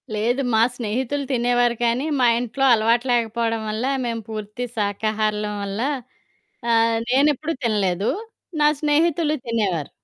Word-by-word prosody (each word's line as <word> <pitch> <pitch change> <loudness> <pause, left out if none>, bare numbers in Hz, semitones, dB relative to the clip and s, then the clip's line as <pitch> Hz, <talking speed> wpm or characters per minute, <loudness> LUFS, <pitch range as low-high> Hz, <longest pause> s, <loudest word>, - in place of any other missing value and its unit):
లేదు. 240 +6 0
మా 220 - +4
స్నేహితులు 255 +5 -2
తినేవారు 245 -1 +2
కానీ, 240 +4 +1
మా 245 - +5
ఇంట్లో 245 +3 -3
అలవాటు 230 +2 +2
లేకపోవడం 230 -1 0
వల్ల 215 +2 -3 0.2
మేము 230 -1 -2
పూర్తి 215 +2 -5
శాకాహారులం 210 0 -1
వల్ల. 200 +2 -4 0.9
ఆహ్, 230 0 +3
నేనెప్పుడూ 295 +4 +2
తినలేదు. 200 -3 +1 0.5
నా 295 - +5
స్నేహితులు 305 +1 +2
తినేవారు. 200 -10 -1
230 Hz, 120 wpm, -22 LUFS, 215-250 Hz, 0.9 s, మా